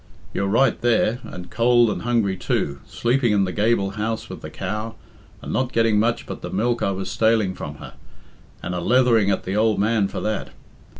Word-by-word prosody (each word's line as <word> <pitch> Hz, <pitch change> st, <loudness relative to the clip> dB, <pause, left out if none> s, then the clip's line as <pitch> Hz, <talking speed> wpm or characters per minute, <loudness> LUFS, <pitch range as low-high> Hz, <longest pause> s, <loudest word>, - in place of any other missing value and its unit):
You're 100 Hz, -, -1 dB
right 115 Hz, +5 st, +2 dB
there, 120 Hz, 0 st, +2 dB
and 90 Hz, 0 st, -9 dB
cold 120 Hz, -1 st, +4 dB
and -, -, -4 dB
hungry 115 Hz, -5 st, +1 dB
too, 70 Hz, -6 st, -2 dB
sleeping 120 Hz, -1 st, +1 dB
in 100 Hz, -1 st, +3 dB
the 95 Hz, -, -1 dB
gable 105 Hz, -1 st, +1 dB
house 110 Hz, +2 st, -3 dB
with -, -, -8 dB
the -, -, -7 dB
cow, 110 Hz, +1 st, -4 dB, 0.5 s
and -, -, -5 dB
not 130 Hz, -1 st, 0 dB
getting 115 Hz, -3 st, +3 dB
much 115 Hz, +2 st, 0 dB
but -, -, -7 dB
the -, -, -5 dB
milk 120 Hz, +4 st, 0 dB
I -, -, +1 dB
was 95 Hz, -1 st, -3 dB
staling 110 Hz, -2 st, +2 dB
from 75 Hz, -4 st, -7 dB
her, -, -, -11 dB, 0.7 s
and 90 Hz, -, -3 dB
a 90 Hz, -, -2 dB
leathering 120 Hz, 0 st, +3 dB
at 100 Hz, -, 0 dB
the 95 Hz, -, -3 dB
ould 110 Hz, 0 st, +2 dB
man 105 Hz, -1 st, +2 dB
for -, -, -5 dB
that. 110 Hz, -1 st, -2 dB
110 Hz, 200 wpm, -22 LUFS, 100-115 Hz, 0.7 s, cold